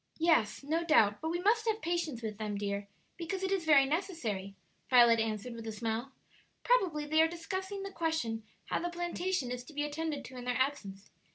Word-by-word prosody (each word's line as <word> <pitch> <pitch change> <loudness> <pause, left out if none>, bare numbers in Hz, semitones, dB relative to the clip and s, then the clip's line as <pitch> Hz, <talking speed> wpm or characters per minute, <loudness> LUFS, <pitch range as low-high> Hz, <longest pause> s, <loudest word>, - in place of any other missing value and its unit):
"Yes, 315 -10 +2
no 320 +4 0
doubt; 225 -11 +4
but 320 - -2
we 345 +1 -1
must 445 +5 +2
have 440 -1 +1
patience 330 - -2
with 215 -1 -4
them, 210 -2 -3
dear, 200 0 -3 0.3
because 360 +3 -4
it 380 - 0
is 380 -4 0
very 290 -3 +6
necessary," 270 - -2 0.3
Violet 235 -2 +7
answered, 220 +2 -2
with 230 -1 -8
a - - -2
smile. 225 +4 -3 0.5
"Probably 365 -12 +2
they 310 +2 +3
are 320 - +5
discussing 380 +4 -4
the 390 - -5
question 320 -11 -1 0.2
how - - -1
the 350 - -2
plantation 345 -4 -2
is 250 0 -4
to 310 - -13
be 295 0 -1
attended 295 -1 -3
to 255 - -10
in 245 - -7
their 250 -1 0
absence. 215 -8 -2
295 Hz, 200 wpm, -32 LUFS, 225-345 Hz, 0.5 s, Violet